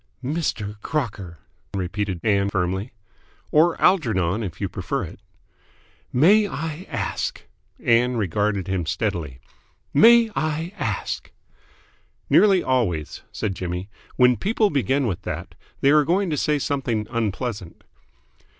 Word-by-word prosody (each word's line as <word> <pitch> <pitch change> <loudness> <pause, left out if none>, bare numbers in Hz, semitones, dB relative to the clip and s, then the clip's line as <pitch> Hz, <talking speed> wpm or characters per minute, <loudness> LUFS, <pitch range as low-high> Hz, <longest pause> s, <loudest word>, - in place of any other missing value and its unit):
"Mr. 110 -9 -2
Crocker!" 100 - -3 0.4
repeated 95 0 -2
Ann 100 -2 +2
firmly. 95 +4 -2 0.6
"Or 160 +2 +4
Algernon, 110 - +2
if 95 -7 -5
you - - -1
prefer - - -3
it." - - -9 0.9
"May 200 +11 +5
I 160 0 -5
ask - - -3 0.2
" - - -40
Ann 120 +1 +2
regarded 100 0 0
him 95 -4 -2
steadily. 85 -7 -2 0.6
"May 230 +7 +6
I 155 +3 -2
ask." - - -3 1.0
"Nearly 195 -3 +5
always," 100 - -1
said 100 - -2
Jimmy, 90 +2 -5 0.2
"when 125 -1 +5
people 210 - +1
begin 140 0 +1
with 95 -7 -2
that, - - -6 0.3
they 140 - +5
are 150 0 +6
going 180 +3 +1
to - - +1
say 150 +1 +1
something 130 -6 -1
unpleasant." 110 -4 -3
115 Hz, 125 wpm, -23 LUFS, 95-155 Hz, 1.0 s, May